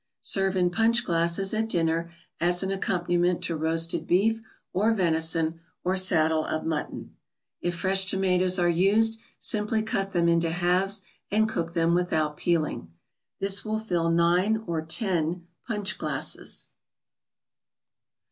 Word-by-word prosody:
Serve 195 -1 +1
in 180 -1 +2
punch 230 +5 +2
glasses 170 +4 +1
at 220 +1 -1
dinner 165 -2 0 0.3
as 175 +2 +2
an 190 - -2
accompaniment 175 -2 0
to 165 - -1
roasted 165 +1 -1
beef, 220 +6 +2 0.3
or 210 +5 +2
venison, 165 -2 0 0.2
or 185 +1 0
saddle 160 -4 +3
of 155 - -3
mutton. 160 -2 -4 0.5
If 175 0 -2
fresh 190 +1 +1
tomatoes 185 -1 +1
are 175 -1 +2
used, 205 +6 +3 0.2
simply 215 +1 +1
cut 195 -2 -2
them 170 -2 +1
into 170 0 +2
halves 180 +4 +1 0.3
and 220 +1 +2
cook 170 -5 -3
them 165 0 +2
without 160 -4 0
peeling. 155 - -1 0.5
This 195 0 +1
will 215 0 -2
fill 175 -6 -1
nine 175 +6 +2
or 165 -2 -2
ten 170 -2 -2 0.2
punch 210 -4 -2
glasses. - - -1
180 Hz, 135 wpm, -26 LUFS, 165-195 Hz, 0.5 s, saddle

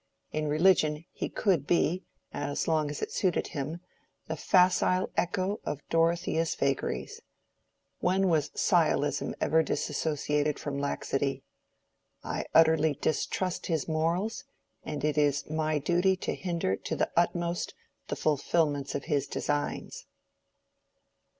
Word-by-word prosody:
In 155 0 -1
religion 155 -1 +3
he - - -4
could 175 -9 +1
be, 175 +1 +2 0.3
as 145 0 -2
long 155 -2 +2
as 145 - -4
it - - -3
suited 185 -3 0
him, 150 +4 -4 0.4
the 160 - -3
facile 185 +2 +3
echo 185 +3 0
of 145 - -5
Dorothea's 165 0 +1
vagaries. 140 -1 -2 0.8
When 190 +2 +2
was 160 -4 +2
sciolism - - +2
ever 160 +1 +3
dissociated 150 -1 -1
from 140 -1 -4
laxity? 140 -1 -1 0.8
I - - -3
utterly 160 -2 +5
distrust 180 +3 -1
his 160 -5 -1
morals, 170 +7 0 0.4
and 150 -2 -5
it 150 0 +1
is 145 -1 +1
my 155 0 0
duty 175 +6 +2
to 185 - -3
hinder 170 - -1
to - - -4
the - - 0
utmost 170 0 0 0.3
the - - -2
fulfilment 145 -1 0
of 140 - -2
his 145 -4 0
designs." 145 0 -3
160 Hz, 125 wpm, -29 LUFS, 145-175 Hz, 0.8 s, utterly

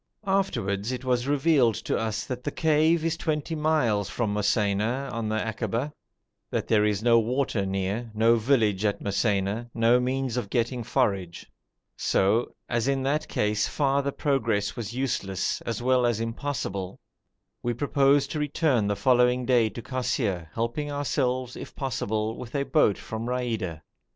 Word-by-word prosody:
Afterwards 120 - 0
it 130 0 -5
was 125 0 +1
revealed 140 -5 +3
to - - -2
us 110 0 -2
that 125 -1 -5
the - - -1
cave 160 +2 +2
is 165 -1 +1
twenty 155 0 -2
miles 150 - +1
from 110 -4 -1
Mosaina 105 +5 0
on 115 -2 -2
the 110 - 0
akaba, 115 +6 -2 0.6
that - - -2
there 105 -2 +3
is 105 -1 0
no 115 -1 +6
water 115 -3 0
near, 100 +5 -2
no 115 +2 +5
village 110 -5 +2
at 105 -1 +1
Mosaina, 100 +2 0
no 115 +1 +4
means 130 0 -1
of 120 -5 -3
getting 120 +2 0
forage; 100 -8 -1 0.5
so, 105 +5 +1
as 120 +1 0
in 135 -1 +1
that 145 +3 0
case 105 0 0
farther 140 -1 +1
progress 115 -9 0
was 115 -3 -5
useless, 115 -7 -2
as 115 0 -3
well 125 -1 +3
as 120 -2 0
impossible, 115 -6 -4 0.6
we 120 - -1
proposed 140 +2 +2
to 155 - -2
return 145 -6 +1
the 105 - 0
following 125 +1 +3
day 120 -3 +3
to 115 +3 -8
Kosseir, 105 - -2
helping 120 +6 -2
ourselves, 130 -3 -1
if - - -9
possible, 110 -4 -2
with 125 +2 -8
a 140 - +1
boat 145 -11 +3
from 110 +1 -5
Raida. 115 -10 -2
120 Hz, 155 wpm, -26 LUFS, 105-135 Hz, 0.6 s, no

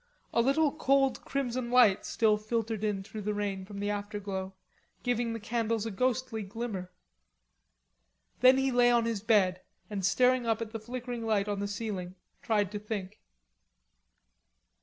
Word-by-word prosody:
A 235 - +4
little 275 +4 +3
cold 275 -3 +2
crimson 255 -3 -2
light 240 -6 +5
still 220 -2 +3
filtered 220 0 -2
in 205 -2 -1
through 215 +2 -7
the 210 +1 -2
rain 200 -2 -2
from 200 +1 -9
the 205 +1 -1
afterglow, 200 -2 -4 0.5
giving 240 -1 0
the 230 - -4
candles 225 0 -1
a 225 - -3
ghostly 250 +1 -1
glimmer. 200 -3 -5 1.5
Then 255 +1 +7
he 270 0 +1
lay 245 0 +5
on 235 -1 +3
his 230 -3 -1
bed, 195 -5 +3 0.3
and 200 -2 -3
staring 250 +5 +3
up 225 -1 +1
at 225 -2 -5
the 225 - -5
flickering 240 +1 -5
light 215 -2 +1
on 205 -1 -2
the 200 - -1
ceiling, 200 -3 -4 0.3
tried 210 -5 +1
to 210 - -4
think. 210 -1 -5
220 Hz, 160 wpm, -30 LUFS, 205-240 Hz, 1.5 s, Then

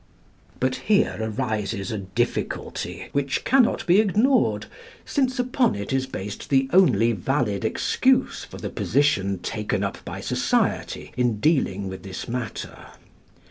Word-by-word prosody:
But 130 0 0
here 210 0 +4
arises 110 -3 -2
a 110 - -2
difficulty, 95 -1 -3
which 140 -1 -1
cannot 260 -2 +3
be 180 +2 +5
ignored, 220 +6 +2 0.4
since 260 -2 0
upon 250 - +1
it 100 +5 -4
is 135 0 0
based 100 -5 -6
the 135 -1 +3
only 175 -11 +5
valid 110 -1 -1
excuse - - +1
for - - -10
the - - -5
position 100 -8 +1
taken 105 +1 -2
up 100 - -4
by - - -6
society - - -1
in 120 -4 +1
dealing 105 - +1
with 95 0 -7
this 95 -1 -7
matter. 120 -3 -5
125 Hz, 135 wpm, -24 LUFS, -, 0.4 s, be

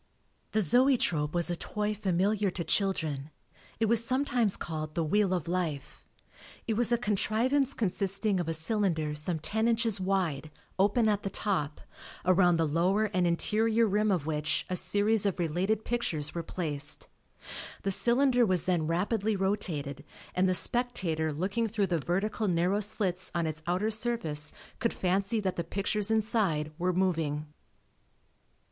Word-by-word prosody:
The 215 - +3
Zoetrope 180 - +2
was 175 0 +1
a - - 0
toy 210 +4 -3
familiar 200 +1 0
to 180 -1 -4
children; 160 -8 -1 0.5
it 225 - +2
was 230 +1 +4
sometimes 250 -4 +2
called 155 -2 -5
the 170 - +1
wheel 195 +4 +2
of 175 -4 -1
life. 165 -6 -3 0.6
It 225 - 0
was 235 +2 +2
a 240 - +4
contrivance 240 +5 +1
consisting 200 -1 0
of 175 - -2
a - - 0
cylinder 160 -3 0
some 150 +3 -1
ten 220 +8 -1
inches 225 -3 +1
wide, 180 -6 -1 0.3
open 210 +4 +3
at 205 -1 +1
the 195 - -3
top, 180 -7 -2 0.4
around 180 -2 +4
the 165 - +2
lower 185 +7 +1
and 180 -1 +2
interior 220 +6 +2
rim 210 +1 +1
of 180 -7 0
which 155 -1 -1
a - - +1
series 205 +2 +2
of 195 - -1
related 185 +6 -1
pictures 165 -11 -2
were 170 - -3
placed. 150 -4 -2 0.8
The 195 - 0
cylinder 245 +4 +4
was 185 -6 +2
then 175 -4 0
rapidly 205 +5 0
rotated 160 -8 -2 0.3
and 185 +1 +2
the 185 - +3
spectator 175 -10 +1
looking 195 +9 -1
through 210 -2 0
the 175 -3 -1
vertical 205 +7 -1
narrow 180 +3 +1
slits 190 -3 0
on 170 -1 0
its 160 0 -4
outer 185 +5 0
surface, 215 -10 -1 0.3
could 230 - -1
fancy 195 +4 0
that 190 -2 -2
the 170 - -1
pictures 200 +4 -2
inside 210 -9 +1
were 180 +1 +1
moving. 165 -5 0
190 Hz, 155 wpm, -29 LUFS, 165-215 Hz, 0.8 s, was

